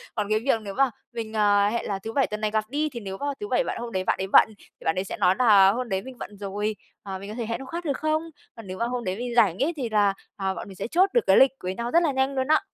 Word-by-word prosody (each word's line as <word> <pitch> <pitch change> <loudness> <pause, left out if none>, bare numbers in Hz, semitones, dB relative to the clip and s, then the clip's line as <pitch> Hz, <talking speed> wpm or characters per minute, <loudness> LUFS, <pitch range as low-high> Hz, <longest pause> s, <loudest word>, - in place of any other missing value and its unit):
Còn 210 -2 -2
cái 215 0 +2
việc 230 -1 +1
nếu 200 -2 -6
mà 270 +3 +2 0.2
mình, 225 -2 -5
ờ, 205 -1 +3
hẹn 235 +2 -2
là 195 -1 -2
thứ 225 +3 -7
Bảy 270 +1 +2
tuần 210 0 -5
này 215 -1 0
gặp 215 0 +1
đi, 300 +3 -1
thì 250 -4 -7
nếu 195 -3 -6
mà 285 - -4
thứ 415 - -5
Bảy - - +2
bạn - - -4
hôm 235 0 -6
đấy 185 -2 -1
bạn - - +1
ấy 190 - -2
bận, 195 - +6
thì - - -20
bạn 160 - +2
ấy 185 - -1
sẽ 195 - -6
nói 180 - +3
nà: 200 -5 +6
"Hôm 245 +3 -3
đấy 190 -1 -1
mình 260 +3 -11
bận 205 -2 -9
rồi, 205 +2 -3 0.3
ờ, 195 -1 -6
mình 200 +1 -8
có 215 - -6
thể 235 -1 -3
hẹn 230 +1 -3
hôm 265 - -9
khác 340 +4 -5
được 280 -4 -1
không?" 310 +1 0 0.3
Còn 225 -3 -11
nếu 185 0 -6
mà 235 - 0
hôm 245 0 -3
đấy 185 -3 -2
mình 240 +2 -4
rảnh 205 -2 +4
ấy, 330 +5 0
thì 250 -5 -2
là, 205 -2 +3 0.2
à, 190 -1 -1
bọn - - -7
mình 195 - -11
sẽ 195 - -4
chốt 365 +9 +3
được 480 - +4
cái - - +6
lịch 265 - +7
với 185 +1 -3
nhau 235 +2 -3
rất 340 +1 +4
là 315 - +2
nhanh 265 +1 0
luôn 260 0 0
á. 310 +1 +4
220 Hz, 335 wpm, -25 LUFS, 200-265 Hz, 0.3 s, lịch